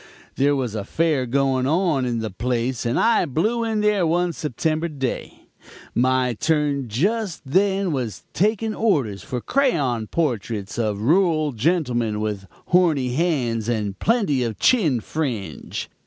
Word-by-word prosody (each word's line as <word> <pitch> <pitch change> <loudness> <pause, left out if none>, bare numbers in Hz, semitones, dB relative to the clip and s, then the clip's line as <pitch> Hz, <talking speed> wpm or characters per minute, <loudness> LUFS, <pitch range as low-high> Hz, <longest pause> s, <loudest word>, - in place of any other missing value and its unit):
There 145 +1 +3
was 125 -5 -2
a 105 -2 -3
fair 150 0 0
going 130 0 +1
on 160 -4 +1
in 120 -2 -1
the 110 -2 -4
place, 120 +3 -2
and 115 - +1
I 230 -1 +3
blew 215 - 0
in 220 -2 0
there 210 -4 +2
one 175 +1 +1
September 155 +3 -1
day; 135 -6 -5 0.5
my 130 0 +2
turn 145 0 0
just 190 - -1
then 190 +5 +1
was 125 - -3
taking 215 +3 +1
orders 135 - 0
for 125 - -4
crayon 140 - +1
portraits 115 -9 -2
of 105 -2 -1
rural 155 - +3
gentlemen 120 -5 0
with 105 -2 -3 0.2
horny 165 -8 +3
hands 125 -8 0
and 105 -4 -2
plenty 205 - +1
of 115 -3 -2
chin 160 - +3
fringe. 115 - -4
140 Hz, 140 wpm, -22 LUFS, 120-175 Hz, 0.5 s, There